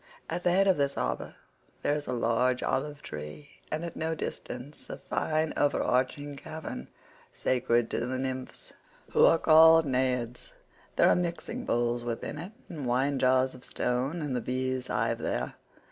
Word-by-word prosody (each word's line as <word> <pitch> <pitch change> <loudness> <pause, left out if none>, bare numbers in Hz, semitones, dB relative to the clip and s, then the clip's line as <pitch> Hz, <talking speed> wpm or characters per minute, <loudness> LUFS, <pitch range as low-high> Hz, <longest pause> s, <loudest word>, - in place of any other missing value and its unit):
At 175 - -2
the 180 - +4
head 195 +2 +4
of 190 - +4
this 140 -1 +1
harbour - - -2 0.5
there - - +2
is 150 0 -3
a - - -2
large 125 +1 +1
olive 145 +2 -1
tree, 75 - -8 0.2
and 155 +2 -2
at 170 - -6
no 160 +1 -1
great - - -15
distance 130 +2 -6
a - - -5
fine 155 0 -1
overarching 145 0 +1
cavern 155 - -7 0.4
sacred 120 -2 +1
to 120 - -1
the 130 +1 -2
nymphs 130 0 -5 0.4
who - - +4
are 165 - +6
called 160 0 +7
Naiads.113 125 -2 -3
There - - +5
are - - +5
mixing 180 +8 -3
bowls 120 0 0
within 120 +5 -4
it 175 +6 -7 0.2
and 150 -7 -5
wine 135 +3 +1
jars 130 0 +3
of 130 - -13
stone, 130 +7 -1
and 140 -4 -2
the 125 - 0
bees 130 +1 -2
hive 115 -1 0
there. - - -2
130 Hz, 170 wpm, -29 LUFS, 125-155 Hz, 0.5 s, called